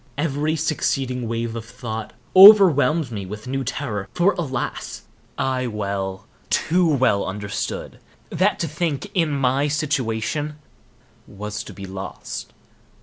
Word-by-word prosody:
Every 150 +1 0
succeeding 135 -5 -1
wave 115 0 -3
of 115 - -5
thought 110 -1 -6 0.2
overwhelmed 170 - +8
me 105 -3 -4
with 105 +2 -8
new 135 +1 -2
terror, 115 -6 -4
for, 180 +3 +3
alas! 135 -8 -4 0.3
I 130 -1 0
well, 100 -3 -3 0.2
too 175 +2 +2
well 130 -9 +2
understood 100 0 -4 0.3
that - - +2
to 165 - 0
think, 155 +3 -3
in 165 -5 +2
my 140 0 +1
situation, 145 -1 -1 0.7
was 105 +1 -6
to - - -9
be 100 - -8
lost. 95 0 -7
130 Hz, 125 wpm, -22 LUFS, 105-155 Hz, 0.7 s, overwhelmed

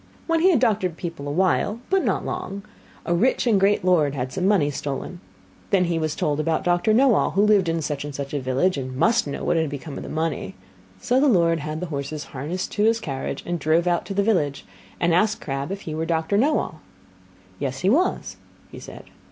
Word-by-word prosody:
When 330 -1 +1
he 360 +4 +5
had 335 - +4
doctored 200 -8 +1
people 165 -5 -6
awhile, 185 +7 +1
but 385 -1 +3
not - - 0
long, 195 +1 -5 0.4
a 175 - 0
rich 225 +11 +2
and 220 -5 +3
great 195 -1 +2
lord 155 -6 +3
had 130 0 -4
some 185 0 0
money 175 -8 +3
stolen. 145 +5 -5 0.5
Then 190 -2 +3
he 170 -1 -1
was 155 -1 -2
told 150 0 -1
about 160 0 0
Doctor 175 +4 +2
Knowall 240 - +3
who 195 +4 +3
lived 205 -5 +4
in 165 -1 -1
such 145 -2 -3
and 145 -1 -7
such 140 0 -5
a 145 - 0
village, 135 +6 0
and 130 -1 -6
must 230 - +2
know 140 - -5
what - - +1
had 160 -2 +1
become 145 +1 -7
of - - -6
the - - -8
money. 155 - -3 0.4
So 250 - +1
the 290 - +4
lord 170 -8 +3
had 155 +2 -5
the - - -2
horses 145 +2 -4
harnessed 155 +8 -4
to 210 - 0
his 225 +1 +3
carriage, 135 -10 -5 0.2
drove 160 +3 +2
out 175 -1 0
to 195 - -5
the 200 - +2
village, 155 -10 0 0.3
and 170 -1 +2
asked 210 +5 +2
Crabb 140 +2 -4
if 195 0 -5
he 160 - -6
were 160 +1 -3
Doctor 160 +3 0
Knowall. 240 - +1 0.8
Yes, 135 0 -3
he 185 - +2
was, 345 +9 0 0.3
he - - -9
said. - - -10
170 Hz, 215 wpm, -23 LUFS, 145-200 Hz, 0.8 s, he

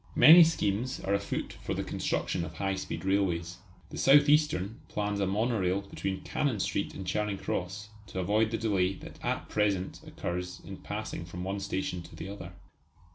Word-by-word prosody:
Many 170 +3 +10
schemes 125 -6 0
are 100 - -1
afoot 100 0 -2
for - - -3
the - - -2
construction 85 - -1
of - - -7
high 95 -1 -1
speed 95 0 -5
railways. 90 -3 0 0.3
The - - -6
South 145 +2 +6
Eastern 145 -10 +2
plans 105 -1 -2
a 100 - +1
monorail 100 -2 +1
between 100 -1 -4
Cannon 140 -8 -1
Street - - -1
and 95 - -6
Charing 105 +1 -1
Cross 95 +3 -4 0.2
to 95 - -8
avoid 105 +4 +2
the 115 - -1
delay 95 -4 +1
that - - -12
at - - -1
present 100 -3 0
occurs 90 +1 -4
in 95 - -7
passing 105 -4 -5
from 90 +2 -7
one 95 +2 -2
station 95 -2 -2
to - - -12
the 90 - -7
other. 90 -3 -8
100 Hz, 180 wpm, -30 LUFS, 90-105 Hz, 0.3 s, Many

